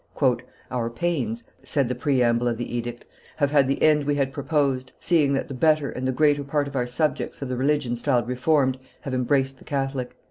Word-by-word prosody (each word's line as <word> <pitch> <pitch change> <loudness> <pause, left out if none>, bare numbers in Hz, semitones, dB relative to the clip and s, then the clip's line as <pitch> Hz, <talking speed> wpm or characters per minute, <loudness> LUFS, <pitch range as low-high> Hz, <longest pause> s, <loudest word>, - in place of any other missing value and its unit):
"Our 120 -2 -1
pains," 120 -4 -2 0.2
said 140 -4 0
the 125 - -1
preamble 120 -2 +2
of 120 -1 0
the 120 0 -4
edict, 120 0 -4 0.3
"have 145 -2 +1
had 140 -3 +4
the 135 - 0
end 150 -1 +5
we 145 0 +1
had 135 -1 0
proposed, 140 -3 0
seeing 150 -5 +3
that 135 - -1
the 140 - -6
better 155 +1 +2
and 130 +1 -3
the - - +2
greater 145 +1 +3
part 145 +1 0
of 140 - -8
our 125 -2 0
subjects 145 +2 -1
of 135 - -5
the 130 - -1
religion 135 -1 +1
styled 120 -1 +1
Reformed 130 +1 +1 0.2
have 135 - -5
embraced 135 +1 +1
the - - -15
Catholic. 135 -3 -3
135 Hz, 205 wpm, -24 LUFS, 125-145 Hz, 0.3 s, end